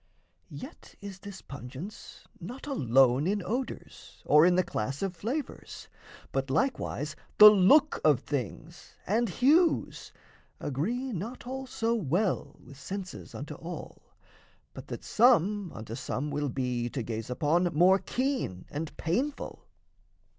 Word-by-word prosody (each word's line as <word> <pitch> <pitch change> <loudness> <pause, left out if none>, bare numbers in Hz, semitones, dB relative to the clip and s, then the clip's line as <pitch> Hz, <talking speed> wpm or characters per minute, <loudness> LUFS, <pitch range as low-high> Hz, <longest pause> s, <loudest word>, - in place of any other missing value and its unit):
Yet - - -11
is 200 -2 -9
this 200 -1 -10
pungence 140 - -9 0.2
not 240 +11 -8
alone 135 - +3
in 205 0 0
odours 245 +4 -6
Or 150 +3 +6
in 180 - +4
the 185 - +3
class 135 - -3
of 190 -2 -2
flavours; 250 - -5 0.4
but, 135 0 -2
likewise, 150 - -1 0.2
The 210 0 +12
look 270 +10 +5
of 145 -5 +4
things 145 - -6
and 225 +3 +1
hues 310 - +2 0.5
agree 230 - -2
not 215 +9 -6
all 265 +1 -5
So 230 -2 -1
well 180 - 0
with 140 - -13
senses 190 +4 -7
unto - - -6
all, - - -8 0.7
but - - -10
that - - -7
Some 210 -5 +3
unto 110 0 -8
some 135 +3 -3
will 145 0 -1
be, 125 -2 -2
to 130 -1 -4
gaze 110 0 -5
upon, 155 +7 +1
More 180 +5 +5
keen 255 - -2
and 155 +2 -5
painful. 260 - -3
180 Hz, 130 wpm, -29 LUFS, 140-230 Hz, 0.7 s, The